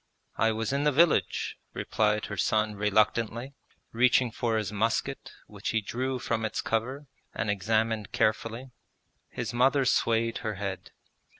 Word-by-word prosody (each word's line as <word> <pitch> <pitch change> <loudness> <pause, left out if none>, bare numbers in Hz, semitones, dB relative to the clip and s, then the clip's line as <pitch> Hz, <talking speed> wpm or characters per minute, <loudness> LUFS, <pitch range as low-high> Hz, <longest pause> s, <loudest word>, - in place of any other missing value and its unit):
'I 110 0 +3
was 115 +4 -2
in 140 +1 +1
the 150 - +4
village,' 145 - +2 0.2
replied 105 0 0
her 105 - -5
son 110 +2 +1
reluctantly, 110 +5 +1 0.4
reaching 125 +1 +3
for 115 -1 -1
his 105 -3 -2
musket, 110 +2 -1
which - - -6
he 115 - +2
drew 125 +5 -3
from 115 -2 -2
its 110 -1 -2
cover 130 +6 -2 0.3
and 115 -2 0
examined 110 +2 0
carefully. 115 +4 -1 0.6
His - - -4
mother 135 +3 +3
swayed 115 -2 +1
her 110 -2 -3
head. 95 -1 -5
115 Hz, 140 wpm, -28 LUFS, 105-125 Hz, 0.6 s, the